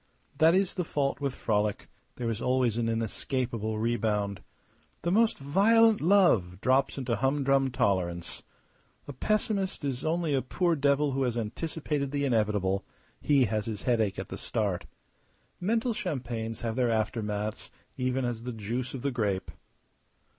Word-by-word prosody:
That 160 Hz, +2 st, +6 dB
is 190 Hz, 0 st, +2 dB
the 180 Hz, -, -1 dB
fault 145 Hz, -3 st, -1 dB
with 140 Hz, -2 st, -1 dB
frolic; 105 Hz, -2 st, -1 dB, 0.3 s
there 120 Hz, -, -3 dB
is 115 Hz, +1 st, -4 dB
always 125 Hz, -3 st, +2 dB
an 115 Hz, -1 st, 0 dB
inescapable 115 Hz, 0 st, -2 dB
rebound. 105 Hz, -4 st, 0 dB, 0.6 s
The 170 Hz, -, 0 dB
most 225 Hz, +3 st, +3 dB
violent 215 Hz, +10 st, +4 dB
love 155 Hz, -, +4 dB
drops 130 Hz, +5 st, +2 dB
into 125 Hz, -4 st, -1 dB
humdrum 135 Hz, +1 st, +2 dB
tolerance. 90 Hz, -7 st, -1 dB, 0.7 s
A 145 Hz, -, -6 dB
pessimist 200 Hz, -, -1 dB
is 135 Hz, -1 st, -2 dB
only 160 Hz, -1 st, 0 dB
a 135 Hz, -, +2 dB
poor 170 Hz, +6 st, +1 dB
devil 140 Hz, 0 st, +2 dB
who 135 Hz, +1 st, -1 dB
has 125 Hz, -3 st, 0 dB
anticipated 145 Hz, +5 st, -2 dB
the 140 Hz, 0 st, -1 dB
inevitable; 105 Hz, -5 st, +1 dB, 0.4 s
he 140 Hz, -3 st, +4 dB
has 110 Hz, 0 st, -2 dB
his 110 Hz, -3 st, -5 dB
headache 115 Hz, -5 st, +1 dB
at -, -, -5 dB
the -, -, -6 dB
start. 100 Hz, -5 st, -2 dB, 0.7 s
Mental 225 Hz, +5 st, +1 dB
champagnes 120 Hz, -, -4 dB
have 115 Hz, -1 st, -2 dB
their 125 Hz, -1 st, +2 dB
aftermaths 110 Hz, -1 st, -2 dB, 0.3 s
even 130 Hz, 0 st, -1 dB
as 120 Hz, -2 st, -3 dB
the 125 Hz, +1 st, -5 dB
juice 115 Hz, +5 st, -4 dB
of 125 Hz, -, -7 dB
the 140 Hz, -, 0 dB
grape. 105 Hz, -6 st, -1 dB
125 Hz, 150 wpm, -29 LUFS, 110-145 Hz, 0.7 s, That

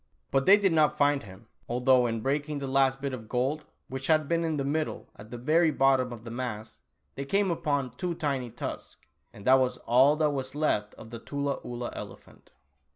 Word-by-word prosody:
But 135 Hz, +3 st, +1 dB
they 200 Hz, +2 st, +9 dB
did 195 Hz, -4 st, +2 dB
not 155 Hz, -2 st, +3 dB
find 145 Hz, -1 st, +3 dB
him, 100 Hz, +3 st, -13 dB, 0.2 s
although 125 Hz, +1 st, +3 dB
in 115 Hz, -1 st, -3 dB
breaking 145 Hz, +3 st, -1 dB
the 140 Hz, -, -4 dB
last 135 Hz, 0 st, +2 dB
bit 140 Hz, -1 st, -3 dB
of 110 Hz, -4 st, -8 dB
gold, 135 Hz, +5 st, -1 dB, 0.2 s
which 130 Hz, 0 st, -5 dB
had 155 Hz, -2 st, +3 dB
been 170 Hz, +1 st, +1 dB
in 160 Hz, -2 st, -1 dB
the 140 Hz, -, -1 dB
middle 155 Hz, +2 st, -3 dB
at 105 Hz, +2 st, -13 dB
the 120 Hz, -, -7 dB
very 160 Hz, +7 st, +3 dB
bottom 135 Hz, -3 st, +2 dB
of 115 Hz, -2 st, -9 dB
the 115 Hz, -, -8 dB
mass, 110 Hz, -, -5 dB, 0.3 s
they 140 Hz, -, -5 dB
came 195 Hz, +6 st, +1 dB
upon 145 Hz, -6 st, -1 dB
two 170 Hz, +8 st, -4 dB
tiny 135 Hz, -6 st, -2 dB
tusks! -, -, -7 dB, 0.3 s
And 100 Hz, -, -13 dB
that 130 Hz, +1 st, +6 dB
was 130 Hz, -1 st, 0 dB
all 130 Hz, +5 st, +5 dB
that 155 Hz, -1 st, +1 dB
was 135 Hz, -1 st, -4 dB
left 105 Hz, -9 st, 0 dB
of 110 Hz, -, -12 dB
the 115 Hz, -, -6 dB
Tula 140 Hz, +2 st, -3 dB
Oolah 120 Hz, 0 st, -5 dB
elephant. -, -, -11 dB
135 Hz, 210 wpm, -28 LUFS, 125-150 Hz, 0.3 s, they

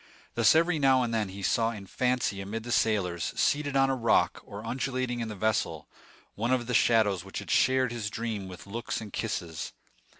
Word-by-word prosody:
Thus 115 Hz, +5 st, +5 dB
every 165 Hz, 0 st, +3 dB
now 135 Hz, -2 st, +4 dB
and 115 Hz, -1 st, -2 dB
then 110 Hz, -3 st, 0 dB
he 95 Hz, +1 st, -8 dB
saw 115 Hz, +4 st, +2 dB
in 105 Hz, -4 st, -7 dB
fancy 125 Hz, -2 st, 0 dB
amid 110 Hz, +3 st, -5 dB
the 120 Hz, -, -6 dB
sailors, 95 Hz, -8 st, 0 dB
seated 145 Hz, -1 st, +1 dB
on 135 Hz, 0 st, +4 dB
a -, -, +1 dB
rock, 115 Hz, -3 st, +2 dB
or 100 Hz, +2 st, -9 dB
undulating 125 Hz, 0 st, -2 dB
in 115 Hz, -, -2 dB
the 105 Hz, -, -6 dB
vessel, 95 Hz, -7 st, -1 dB, 0.5 s
one 115 Hz, +4 st, -1 dB
of 125 Hz, -2 st, +1 dB
the 125 Hz, -, -3 dB
shadows 110 Hz, -6 st, +3 dB
which 95 Hz, -, -8 dB
had -, -, -5 dB
shared 130 Hz, -1 st, +3 dB
his 115 Hz, -3 st, -3 dB
dream 110 Hz, -3 st, -4 dB
with 90 Hz, -1 st, -10 dB
looks 115 Hz, +4 st, -4 dB
and 105 Hz, -3 st, -9 dB
kisses. 85 Hz, -8 st, -4 dB
115 Hz, 200 wpm, -28 LUFS, 100-125 Hz, 0.5 s, Thus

